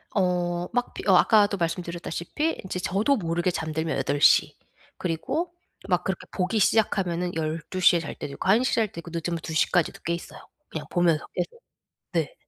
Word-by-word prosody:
어. 175 Hz, -2 st, +1 dB
막 245 Hz, 0 st, -1 dB
비 -, -, -7 dB
아까도 205 Hz, +2 st, +5 dB
말씀드렸다시피 175 Hz, -, -2 dB
인제 185 Hz, -1 st, -4 dB
저도 200 Hz, +10 st, +1 dB
모르게 175 Hz, -1 st, 0 dB
잠들면 160 Hz, -2 st, -2 dB
8 140 Hz, +1 st, -1 dB
시 -, -, +5 dB, 0.4 s
그리고 265 Hz, -, -2 dB, 0.3 s
막 180 Hz, -2 st, +1 dB
그렇게 190 Hz, -2 st, -3 dB
보기 190 Hz, +4 st, 0 dB
시작하면은 180 Hz, -4 st, +1 dB
12 160 Hz, +3 st, -3 dB
시에 175 Hz, -1 st, +6 dB
잘 160 Hz, -, -6 dB
때도 140 Hz, -, -6 dB
있고 -, -, -5 dB
1 220 Hz, +6 st, +5 dB
시에 260 Hz, -, 0 dB
잘 225 Hz, -2 st, +2 dB
때도 170 Hz, -, -10 dB
있고 170 Hz, 0 st, -9 dB
늦으면 170 Hz, 0 st, -2 dB
2 160 Hz, -, -5 dB
시까지도 165 Hz, +2 st, +1 dB
깨 170 Hz, -, -1 dB
있어요, 170 Hz, -, -7 dB, 0.3 s
그냥 -, -, -6 dB
보면서 170 Hz, -3 st, +2 dB
계속. 475 Hz, 0 st, -3 dB, 0.5 s
네. -, -, 0 dB
175 Hz, 340 characters per minute, -26 LUFS, 165-200 Hz, 0.5 s, 시에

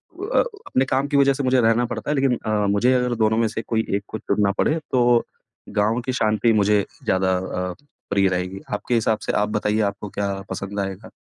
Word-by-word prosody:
उ 390 Hz, +4 st, -6 dB
अ, -, -, +2 dB
अपने 410 Hz, -, -2 dB
काम 135 Hz, +2 st, 0 dB
की 140 Hz, -, +1 dB
वजह 140 Hz, 0 st, +5 dB
से 140 Hz, -, -3 dB
मुझे 130 Hz, 0 st, +3 dB
रहना 115 Hz, +1 st, +3 dB
पड़ता 120 Hz, -, -5 dB
है, -, -, +1 dB
लेकिन 135 Hz, -3 st, +2 dB
अ, 105 Hz, -1 st, +1 dB
मुझे 120 Hz, +6 st, +3 dB
अगर 125 Hz, -1 st, +1 dB
दोनों 110 Hz, -1 st, +2 dB
में 115 Hz, 0 st, +2 dB
से 110 Hz, -, -4 dB
कोई 110 Hz, -1 st, -1 dB
एक 100 Hz, -, -2 dB
को -, -, -5 dB
चुनना 105 Hz, -2 st, +1 dB
पड़े, 160 Hz, +2 st, +2 dB
तो 120 Hz, -2 st, +4 dB, 0.5 s
गाँव 110 Hz, +3 st, +1 dB
की 130 Hz, -, -1 dB
शांति 110 Hz, -1 st, +2 dB
मुझे 105 Hz, -1 st, +3 dB, 0.2 s
ज़्यादा 95 Hz, 0 st, +1 dB
अ, 90 Hz, 0 st, -3 dB, 0.4 s
प्रिय 100 Hz, -1 st, +3 dB
रहेगी। 90 Hz, +1 st, -3 dB
आपके 105 Hz, +4 st, -2 dB
हिसाब 110 Hz, -1 st, +1 dB
से -, -, 0 dB
आप 105 Hz, -, 0 dB
बताइए 105 Hz, 0 st, 0 dB
आपको 100 Hz, +1 st, -8 dB
क्या 100 Hz, 0 st, -2 dB, 0.2 s
पसंद 100 Hz, +1 st, -4 dB
आएगा? 95 Hz, 0 st, -5 dB
110 Hz, 220 wpm, -22 LUFS, 100-125 Hz, 0.5 s, वजह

